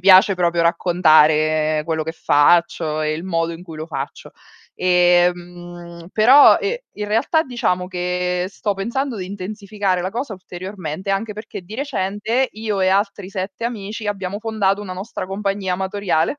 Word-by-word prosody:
piace 190 +1 +7
proprio 170 -1 +1
raccontare 155 -3 +3
quello 160 -1 -1
che 160 - -4
faccio 160 0 +2
e 155 0 0
il 155 - -4
modo 170 -2 -1
in 165 +2 -9
cui 165 -3 -10
lo 155 - -6
faccio. 140 -4 -6 0.5
Ehm, 175 -1 +1
però, 255 +7 +7
ehm, 445 +4 -1 0.2
in 210 0 -4
realtà 230 +9 +2
diciamo 185 -8 -1
che 180 0 -1
sto 205 0 -3
pensando 235 +5 -2
di 185 -2 -5
intensificare 200 -1 -3
la 185 - -2
cosa 240 +1 -4
ulteriormente, 185 -1 -6
anche 210 +2 -1
perché 210 -2 -8
di 205 +5 -10
recente 230 -1 -1
io 215 -2 -3
e 185 - +3
altri 200 0 0
7 195 +3 -5
amici, 215 -2 -5
abbiamo 200 -1 -3
fondato 205 -3 0
una 190 -3 -6
nostra 190 +1 -6
compagnia 195 -1 -2
amatoriale. 190 - -1
185 Hz, 155 wpm, -20 LUFS, 175-205 Hz, 0.5 s, piace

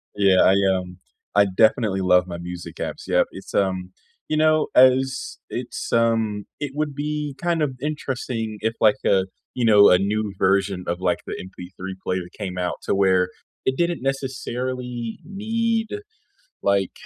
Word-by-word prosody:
Yeah, 100 -2 +4
I, 95 - +5 0.2
um, 90 -1 -5 0.4
I 100 0 +6
definitely 100 0 +2
love 90 -1 +4
my 85 -1 -5
music 85 0 -7
apps, - - -5
yep. - - +3
It's, - - -10
um, 95 -2 0 0.4
you 155 - 0
know, 155 0 +3
as 130 +1 +4
it's, - - -5
um 115 -3 +1
it 145 -2 -3
would 150 -1 -1
be 150 0 -3
kind 170 -2 +1
of 150 -3 +1
interesting 130 -7 -3
if, 110 +1 0
like, 110 -2 +5
a 95 -1 +3 0.3
you 125 - 0
know, 105 -2 +7
a 90 - +6
new 105 +2 -1
version 95 -1 +1
of, 85 +1 -1
like, 90 -1 +1
the - - -4
MP3 95 0 -8
player 90 0 -1
came 95 -3 -5
out 90 -1 -1
to - - 0
where 95 -2 +3 0.4
it 130 0 +1
didn't 170 -1 0
necessarily 125 -3 -3
need, 225 +4 -1 0.8
like, 100 -2 +1
110 Hz, 160 wpm, -23 LUFS, 95-135 Hz, 0.8 s, know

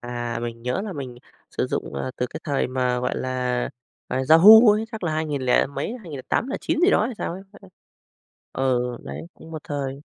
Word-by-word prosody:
À, 120 -1 -4
mình 115 -1 -6
nhớ 125 +5 -1
là 205 -3 -5
mình 130 -5 -7 0.3
sử - - -2
dụng, - - -4
à, 70 - -3
từ 125 - -1
cái - - -8
thời 140 -2 0
mà, 125 -1 -1
gọi 125 - -2
là, 125 -1 -1 0.4
à, 130 - -1
Yahoo 210 +7 +9
ấy, 215 +1 0
chắc 220 -4 -5
là 160 - 0
hai 155 +1 -1
nghìn 145 -3 -3
lẻ 125 - +3
mấy, 140 - -4
2008-2009 220 - -2
gì 365 +3 +5
đó 215 - +3
hay 250 - -5
sao - - -3
ấy, 190 +2 -8 0.2
đấy. 195 - -15 0.8
Ừ, 125 -2 0
đấy, 70 +2 -7
cũng 160 - -14
một 155 -2 -7
thời. 140 -1 -4
135 Hz, 205 wpm, -23 LUFS, 125-175 Hz, 0.8 s, Yahoo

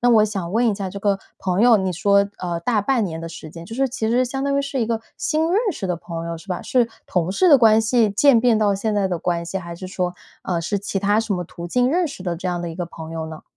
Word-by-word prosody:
那 245 - +3
我 220 -3 +6
想 195 -5 -3
问 230 +5 +2
一 215 - +2
下 195 -1 -4
这 200 +2 -7
个 200 -1 +1 0.2
朋 185 +1 0
友， 235 -1 +7
你 190 -2 -1
说， 200 +3 +3
呃， 175 -2 -3
大 220 +3 +1
半 230 +1 +1
年 165 -3 -4
的 165 - -6
时 160 -1 -9
间， 165 +1 -10
就 225 - -8
是 270 +2 +2
其 245 -3 -3
实 245 +3 +3
相 270 +2 -4
当 280 0 +1
于 280 - +1
是 275 -1 -3
一 225 - +1
个 225 -1 -2 0.2
新 315 +1 +1
认 390 - +4
识 200 - -5
的 180 - 0
朋 165 0 -6
友， 170 0 -4
是 195 - -16
吧？ 180 -1 -3
是 245 -3 +2 0.2
同 180 -1 0
事 360 - +3
的 285 - +8
关 220 -2 +6
系 225 0 +3
渐 230 +4 +4
变 240 -2 +4
到 205 -2 +2
现 215 +2 -1
在 200 -2 +2
的 180 -2 -2
关 170 -1 -1
系， 195 +3 -3
还 170 -2 -8
是 185 - -7
说， 180 -1 -2 0.3
呃， 180 -2 -1
是 185 +5 -1
其 200 0 -3
他 205 +2 +2
什 225 -3 -1
么 180 - -3
途 170 +1 -8
径 250 +5 +2
认 350 +1 +1
识 235 - -9
的 175 -2 -2
这 180 +2 -4
样 175 -1 -2
的 170 - -4
一 - - -8
个 175 0 -4
朋 160 -1 -9
友 160 -1 -4
呢？ 160 -1 -9
200 Hz, 325 characters per minute, -21 LUFS, 175-235 Hz, 0.3 s, 的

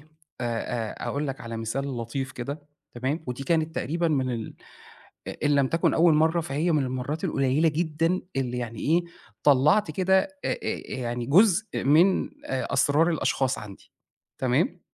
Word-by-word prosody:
أ - - -20 0.4
أ 115 -1 -3
أقول 145 +1 -2
لك 135 -1 -5
على 115 -1 -6
مثال 130 +4 -3
لطيف 130 +3 -4
كده" 140 +4 -6 0.3
تمام؟ 135 +7 -2
ودي 125 +2 -4
كانت 160 +1 0
تقريبًا 170 +2 -1
من 135 -4 0
ال 115 -3 -5 0.7
إ - - -3
إن 145 0 +3
لم 140 -1 +3
تكن 165 +3 +1
أول 165 -1 +5
مرّة 160 +2 +3
فهي 160 +3 -1
من 150 -3 +2
المَرّات 130 +4 -3
القليلة 140 +4 +2
جدًا 165 +3 0 0.2
اللي 125 -2 -1
يعني 115 -2 -5
إيه 165 +4 +3 0.4
طلّعت 150 +7 +4
كده 190 +4 +3
أ - - -4 0.2
أ - - 0 0.4
يعني 120 -1 -3
جزء 200 - +3
من 165 +8 +4
آآ 130 - -3
أسرار 145 +5 +3
الأشخاص 135 -4 0
عندي، 100 -2 -11 0.5
تمام؟ 140 +8 +1
140 Hz, 160 wpm, -26 LUFS, 125-165 Hz, 0.7 s, أول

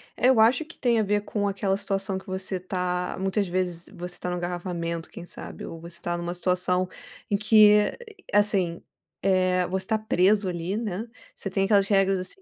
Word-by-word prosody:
Eu 255 -1 +4
acho 230 +8 +5
que 335 - -15
tem 235 -3 +3
a - - +3
ver 205 0 +1
com 205 0 -2
aquela 195 -1 0
situação 195 -1 -1
que 190 - -9
você 190 0 -3
tá 180 -1 -2
muitas 195 +1 0
vezes 175 -1 -2
você 180 0 -7
tá 180 - -3
no 180 - -2
engarrafamento, 175 -1 -4
quem 175 - -9
sabe? - - -9
Ou 165 - -8
você 170 +1 -10
tá 175 0 -2
numa 175 0 -3
situação 180 0 +1 0.4
em 205 - +2
que, 210 0 +5 0.4
assim, 195 -5 +2 0.4
eh, 185 -1 +2
você 190 +1 -2
tá 220 - +2
preso 205 -1 +2
ali, 180 +2 -2
né, 220 -1 -3 0.3
você 485 - -5
tem 195 -1 +1
aquelas 200 -1 +4
regras, 195 -2 +3
assim, 185 - -6
190 Hz, 190 wpm, -26 LUFS, 180-205 Hz, 0.4 s, acho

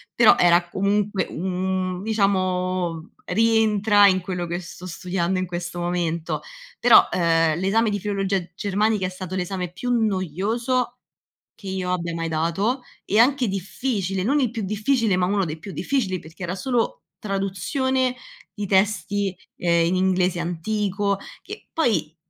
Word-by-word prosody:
Però, 235 -2 +7
era 175 0 +4
comunque 200 0 0
un 185 +1 -2
diciamo, 185 -5 0
rientra 215 -2 +4
in 185 -1 +3
quello 180 -1 -3
che 175 +1 -3
sto 180 0 -10
studiando 180 +1 -2
in 185 - -1
questo 175 0 -5
momento. 175 -2 -2 0.4
Però, - - +7
uhm, 165 -2 +2
l'esame 215 +5 +2
di 205 - -1
filologia 195 -2 -1
germanica 205 0 0
è - - -4
stato 185 0 -6
l'esame 180 -1 -3
più 245 +8 -3
noioso, 225 - 0 0.6
che 200 - -11
io 185 -1 -2
abbia 170 -1 -2
mai 165 0 -2
dato 170 - 0 0.2
e 210 - +2
anche 255 +1 +4
difficile, 195 0 -2
non 280 +8 +2
il 250 -4 +1
più 225 -2 -4
difficile, 215 +1 +1
ma 180 - +2
uno 200 0 +1
dei 160 -1 -5
più 195 - -8
difficili 215 -10 -1
perché 160 +4 -11
era 180 +2 -3
solo 260 - -1 0.2
traduzione 245 - -1 0.4
di 205 -2 -4
testi, 200 0 +1 0.2
ehm, 170 -1 +2
in 180 - +1
inglese 185 -1 +1
antico. 200 +3 -1 0.2
Che - - -10
poi, 185 - 0
190 Hz, 145 wpm, -23 LUFS, 180-215 Hz, 0.6 s, Però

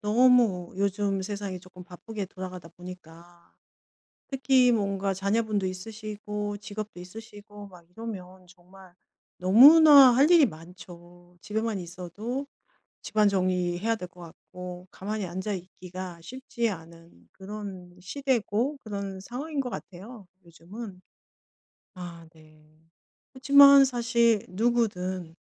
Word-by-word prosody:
너무 220 -4 +3
요즘 200 0 -1
세상이 200 -2 -5
쪼끔 180 -1 -14
바쁘게 200 +3 -7
돌아가다 185 -2 -9
보니까 175 -1 -14 0.7
특히 260 -2 +3
뭔가 200 -3 -1
자녀분도 205 +1 -1
있으시고 210 +1 -6
직업도 210 -1 -8
있으시고 205 +2 -11
막 180 -3 -16
이러면 185 -4 -9
정말 180 +1 -18 0.4
너무나 275 - +8
할 275 +6 +4
일이 335 -4 +7
많죠. 175 -1 -12
집에만 220 -1 -2
있어도 185 +10 -6 0.6
집안 215 -1 +2
정리해야 185 +2 0
될 180 - -7
것 180 -1 -18
같고 180 +1 -10
가만히 210 +1 -5
앉아 190 +4 -4
있기가 180 -1 -9
쉽지 235 +3 -4
않은 165 - -12
그런 190 -3 -9
시대고 255 +4 -1
그런 200 -3 -5
상황인 280 +8 -5
것 255 -2 -3
같아요 200 +2 -10 0.2
요즘은. 185 +4 -10 0.9
아 170 -2 -9
네. 155 -1 -20 0.7
그치만 280 +1 +7
사실 235 -4 +1
누구든 185 -5 -1
195 Hz, 250 characters per minute, -27 LUFS, 180-225 Hz, 0.9 s, 너무나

